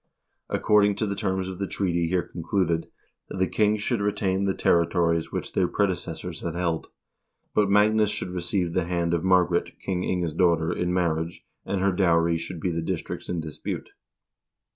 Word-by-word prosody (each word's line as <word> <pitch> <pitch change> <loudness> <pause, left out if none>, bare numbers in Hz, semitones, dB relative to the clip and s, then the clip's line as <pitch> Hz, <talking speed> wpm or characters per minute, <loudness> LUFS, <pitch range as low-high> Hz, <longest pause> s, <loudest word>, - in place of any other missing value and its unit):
According 105 -1 +3
to 110 - -1
the 100 - -1
terms 95 -2 -1
of 95 -1 -6
the 100 - -1
treaty 85 -4 0
here 90 +1 +1
con 85 - -8
cluded, 85 -2 0 0.4
the 95 0 0
kings 105 +2 +1
should 120 -3 0
retain 100 -2 0
the 95 - +1
territories 85 -1 +2
which - - -4
their 90 - +2
predeces 90 -5 -1
sors 90 -3 -6
had 85 -1 -3
held, 85 -2 -1 0.7
but 105 -2 +3
Magnus 105 +1 +4
should 105 -3 -3
receive 90 0 -1
the 90 -1 +1
hand 85 -1 0
of 85 - 0
Margaret, 90 -2 +2
King 90 -2 -2
Inge's 90 -4 -1
daughter, 85 -1 +2
in 90 0 -1
marriage, 85 -2 -1 0.2
and 100 -2 -1
her 100 0 +3
dowry 85 -3 +2
should 85 +1 -6
be 90 +3 -1
the 85 0 -2
districts 80 - -4
in 85 -2 -1
dispute. 75 -2 -6
90 Hz, 180 wpm, -26 LUFS, 85-100 Hz, 0.7 s, Magnus